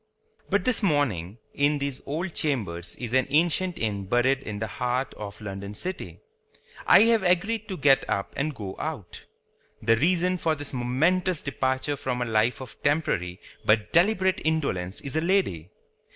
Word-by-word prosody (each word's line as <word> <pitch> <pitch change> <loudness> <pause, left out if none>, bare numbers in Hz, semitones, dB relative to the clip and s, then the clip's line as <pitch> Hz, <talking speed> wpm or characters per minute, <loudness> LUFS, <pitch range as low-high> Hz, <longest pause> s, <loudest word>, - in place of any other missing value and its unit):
But - - +1
this 255 -2 +1
morning, 120 - 0 0.2
in 145 +1 +2
these 140 -2 -3
old 165 +4 -3
Chambers 105 - -2
in 120 -1 -6
an 130 0 +3
ancient 170 +4 +2
Inn 100 -3 -2
buried 125 +5 +2
in 105 -6 -6
the 110 - -2
heart 125 +4 -2
of 105 -1 -8
London 100 -1 -6
City, 185 - -5 0.7
I - - +8
have 230 -1 +4
agreed 195 +5 +1
to 190 - -5
get 140 -1 +4
up 100 - -2
and 150 +1 -2
go 95 -4 -6
out. 150 - -5 0.6
The 115 +1 +3
reason 180 +6 +2
for 160 -2 0
this 145 -1 -7
momentous 155 +8 +1
departure 130 +1 -1
from 130 -3 -2
a 125 - 0
life 115 +3 +1
of 130 - -11
temporary 125 - 0 0.2
but 110 -1 +2
deliberate 190 +1 +3
indolence 120 - -1
is 140 +1 -6
a 160 - +2
lady. 165 - 0
135 Hz, 165 wpm, -26 LUFS, 110-170 Hz, 0.7 s, I